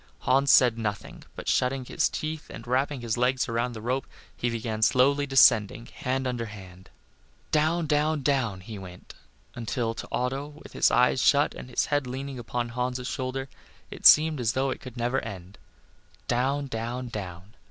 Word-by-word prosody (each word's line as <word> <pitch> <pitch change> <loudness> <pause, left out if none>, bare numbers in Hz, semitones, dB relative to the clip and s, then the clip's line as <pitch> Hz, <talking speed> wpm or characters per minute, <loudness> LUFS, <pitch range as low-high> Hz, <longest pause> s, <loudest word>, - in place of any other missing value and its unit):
Hans 135 +2 +3
said 120 -3 +5
nothing, 105 -2 -5
but - - -8
shutting 130 0 +1
his - - 0
teeth 155 0 -5
and 115 - -9
wrapping 130 +2 0
his 115 -1 -2
legs 125 +1 +1
around 120 +1 -1
the 110 -1 -8
rope, 130 +3 -1 0.3
he 120 - -1
began 110 -1 -3
slowly 140 +5 +3
descending, 115 -4 +4
hand 130 +1 -3
under 120 -2 -2
hand. 95 -3 -12 0.6
Down, 160 +2 +2
down, 150 0 +1
down 120 -9 0
he 105 +2 -8
went, 90 -1 -11 0.4
until 115 0 -2
to - - -8
Otto, 135 +3 -2 0.2
with - - -13
his - - +3
eyes 125 +1 +3
shut 145 +1 +4
and 125 - -9
his 125 - 0
head 145 -3 +1
leaning 135 +1 -5
upon 120 0 -3
Hans' 125 +1 -3
shoulder, 130 0 -3 0.4
it - - +5
seemed 155 -1 +6
as 110 -3 0
though 135 +1 0
it - - -6
could 130 -2 -10
never 120 +3 0
end. 95 0 -9 0.7
Down, 135 +4 0
down, 120 0 -4
down. 95 -2 -7
125 Hz, 175 wpm, -27 LUFS, 115-135 Hz, 0.7 s, seemed